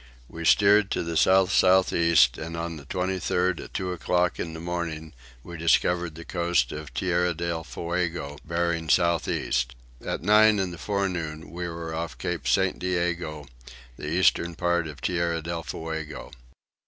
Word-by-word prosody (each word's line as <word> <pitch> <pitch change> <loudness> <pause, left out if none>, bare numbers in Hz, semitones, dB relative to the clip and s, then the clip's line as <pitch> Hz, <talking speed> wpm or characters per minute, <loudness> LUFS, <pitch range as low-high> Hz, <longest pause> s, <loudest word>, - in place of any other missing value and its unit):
We 85 +4 -7
steered 100 +2 +5
to - - -1
the 85 0 -4
south 95 +3 +4
south 95 0 +4
east 85 -8 +4
and 85 +1 -5
on 85 -1 -4
the 70 - -12
23rd 90 -1 -1
at - - -15
two 90 -1 -2
o'clock 90 0 0
in 80 - -4
the 80 - -7
morning 85 -2 -4 0.3
we 85 -1 -8
discovered 85 0 +2
the 85 0 -9
coast 85 -8 0
of 75 -1 -7
Tierra 90 -1 0
del 85 0 -3
Fuego 85 -4 -3
bearing 85 -1 -1
south 85 -1 +3
east. 65 +1 -1 0.3
At - - -3
nine 105 +2 +6
in 95 -2 -1
the 85 - -9
forenoon 85 -2 -3
we 90 +1 -4
were 85 -1 -6
off 85 +1 -4
Cape 80 -7 -3
St. 95 +6 +2
Diego, 85 -4 -2 0.5
the 75 - -7
eastern 85 0 +2
part 85 -1 0
of 75 -3 -10
Tierra 85 -2 0
del 85 +1 -4
Fuego. 80 -1 -6
85 Hz, 165 wpm, -26 LUFS, 80-90 Hz, 0.5 s, nine